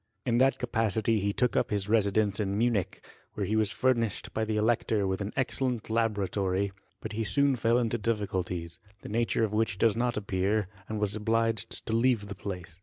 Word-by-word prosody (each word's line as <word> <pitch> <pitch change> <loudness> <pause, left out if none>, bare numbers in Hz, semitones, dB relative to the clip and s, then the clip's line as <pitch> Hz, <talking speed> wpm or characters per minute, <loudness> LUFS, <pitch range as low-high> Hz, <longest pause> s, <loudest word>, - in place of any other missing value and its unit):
In 120 -2 +2
that 135 +1 +4
capacity 110 -2 +1
he 100 +1 0
took 125 +4 0
up - - +2
his 100 -2 -1
residence 105 -1 +2
in 100 -1 -1
Munich, 110 -5 0 0.3
where 100 - -1
he 105 +4 0
was 110 -2 +2
fur 130 +4 +2
nished 115 -4 -3
by 110 - 0
the 110 0 -1
elector 110 -2 +1
with 95 +1 -1
an 100 +1 -3
excellent 125 -4 -1
laboratory: 100 -3 0 0.3
but 110 - -5
he 110 +1 -2
soon 140 +4 +3
fell 115 0 +2
into 120 -1 0
difficulties, 95 -6 -2 0.2
the - - -7
nature 115 +1 +1
of 105 -2 0
which 105 -3 +1
does 110 0 +3
not 120 0 0
appear, 100 0 0 0.2
and 110 -1 -3
was 105 0 -1
obliged 115 0 -1
to 110 - -2
leave 115 -3 +2
the - - -4
place. 90 -4 -7
110 Hz, 195 wpm, -29 LUFS, 100-115 Hz, 0.3 s, that